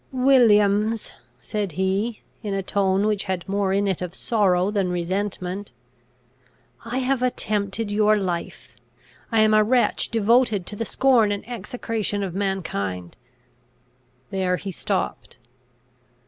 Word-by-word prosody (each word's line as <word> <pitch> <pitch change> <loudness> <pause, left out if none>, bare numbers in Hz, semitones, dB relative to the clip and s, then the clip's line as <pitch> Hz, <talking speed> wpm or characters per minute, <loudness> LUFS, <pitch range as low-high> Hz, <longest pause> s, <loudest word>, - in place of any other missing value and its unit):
"Williams!" 225 -5 +3 0.3
said 200 - -3
he, 195 +6 -1 0.2
in 205 -2 -3
a 195 - -2
tone 195 0 +1
which 210 -2 0
had 185 -1 -3
more 195 0 0
in 200 +1 +1
it 190 -3 -1
of 180 -1 -5
sorrow 195 -4 +2
than 200 -3 0
resentment, 185 +2 -3 1.1
"I 235 +2 -4
have 260 0 0
attempted 210 -3 -1
your 210 +1 +3
life! 180 -4 -4 0.6
I 225 -1 +4
am 215 0 +4
a 215 0 +6
wretch 245 +3 +1
devoted 225 -3 +2
to 205 - -6
the 230 - -3
scorn 240 -4 +3
and 205 +2 -4
execration 230 -4 -3
of 185 -3 -4
mankind!" 100 - -3 1.2
There 185 -1 0
he 195 - -6
stopped. - - -3
205 Hz, 130 wpm, -23 LUFS, 190-225 Hz, 1.2 s, a